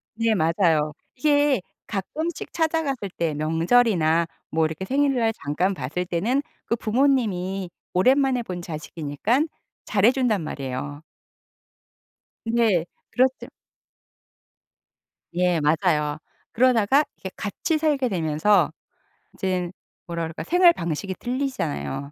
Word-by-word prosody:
네. 230 -1 +2
맞아요. 160 -3 +2 0.2
이게 290 -3 +3 0.3
가끔씩 305 - -4
찾아갔을 310 - 0
때 165 -3 -2
명절이나 165 +1 +2 0.2
뭐 160 0 +2
이렇게 160 +4 -4
생일날 260 -3 +2
잠깐 175 +6 -1
봤을 155 +5 -3
때는 215 +11 0 0.2
그 230 - 0
부모님이 210 -7 0 0.2
오랜만에 255 +5 +3
본 180 -4 -5
자식이니깐 165 - -1 0.4
잘해 215 +4 +4
준단 240 -9 +1
말이에요. 145 +1 -5 1.4
근데 225 -7 +2 0.3
그렇지 260 +1 +1 1.9
예. 180 -2 +2
맞아요 150 -1 +1 0.3
그러다가 255 +3 +4
이게 190 - -6
같이 310 - -1
살게 290 -5 +1
되면서 165 0 +2 0.6
이젠 185 -2 -2 0.3
뭐라 170 -1 -3
그럴까 160 0 -5
생활 355 +1 +6
방식이 175 - -3
틀리잖아요. 250 - -2
195 Hz, 250 characters per minute, -24 LUFS, 165-255 Hz, 1.9 s, 생활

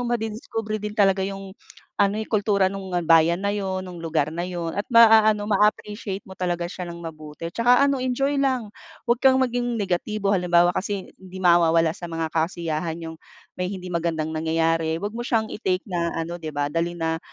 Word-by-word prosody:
madidiskubre 220 -1 -3
din 210 +1 -5
talaga 195 -2 +3
yung 195 -1 -8 0.5
ano, 200 0 +3
eh, 220 - -2
yung - - -11
kultura 200 -3 +2
nung 195 -2 -6 0.2
bayan 165 +3 +5
na 200 - +1
yun, 190 -2 -2
nung 180 -2 -9
lugar 155 -3 -1
na 170 +2 -3
yun, 175 -2 -4
at 205 +4 -3
maa-ano 220 -3 +5
maa-appreciate 210 -1 0
mo - - -17
talaga 175 -1 -1
siya 180 -2 -6
ng 170 0 -8
mabuti. 155 0 -7
Tsaka 245 +7 +4 0.2
enjoy 270 +3 0
lang, 255 -6 0 0.3
wag 240 0 +1
kang 260 0 +5
maging 245 -1 -1
negatibo. 200 0 -1
Halimbawa 175 -2 +3
kasi 195 +1 -3
hindi 190 0 -11
mawawala 165 -2 +4
sa 175 +2 -7
mga 165 -1 -3
kasiyahan 165 0 -2
yung 160 0 -7 0.4
may 180 - -1
hindi 185 -1 -6
magandang 165 -2 -1
nangyayari, 160 +1 0
wag 205 - -2
mo 240 +2 -5
siyang 220 -2 0
i-take 185 -3 -1
na 170 -1 -1
ano 170 +1 -4
'di 155 -3 -7
ba 145 0 -1
dalhin 170 +2 -1
na 160 0 0
185 Hz, 185 wpm, -24 LUFS, 165-210 Hz, 0.5 s, bayan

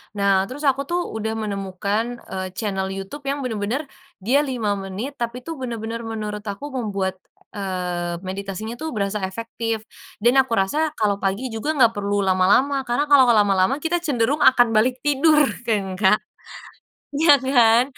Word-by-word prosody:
nah, 195 -1 +2
terus 280 +4 -8
aku 275 0 +1
tuh 350 +1 0 0.2
udah 220 0 -2
menemukan, 200 0 -2 0.3
eee, 190 0 -3
channel 195 -3 -2
YouTube 195 +10 -7
yang 280 0 -1
bener-bener 225 +4 -2 0.4
dia 260 +7 +3
5 230 -8 -1
menit, 195 +8 -5
tapi 240 +1 -4
tuh 325 -2 -7
bener-bener 230 -2 -4
menurut 210 -2 -4
aku 270 +9 -5
membuat, 200 -7 -2 0.3
eee, 180 -3 -3
meditasinya 200 +4 -5
tuh 315 -6 -5
berasa 200 +1 -1
efektif 225 +1 -4 0.4
dan 245 +3 +5
aku 260 -3 +2
rasa 300 +11 0
kalo 205 -2 0
pagi 205 +6 -2
juga 290 +8 -2
gak 230 - +6
perlu 200 0 0
lama-lama, 240 +9 +2
karena 240 +4 +1
kalo 265 -3 +7
lama-lama 195 +1 +3
kita 345 +2 +1
cenderung 285 -3 0
akan 245 -4 +6
balik 245 +4 +1
tidur, 300 +1 +4 0.2
kan 195 -4 -1
Kak? 210 0 +5 1.0
Iya 300 -1 +6
kan, 240 -3 +5
225 Hz, 155 wpm, -22 LUFS, 200-265 Hz, 1.0 s, kalo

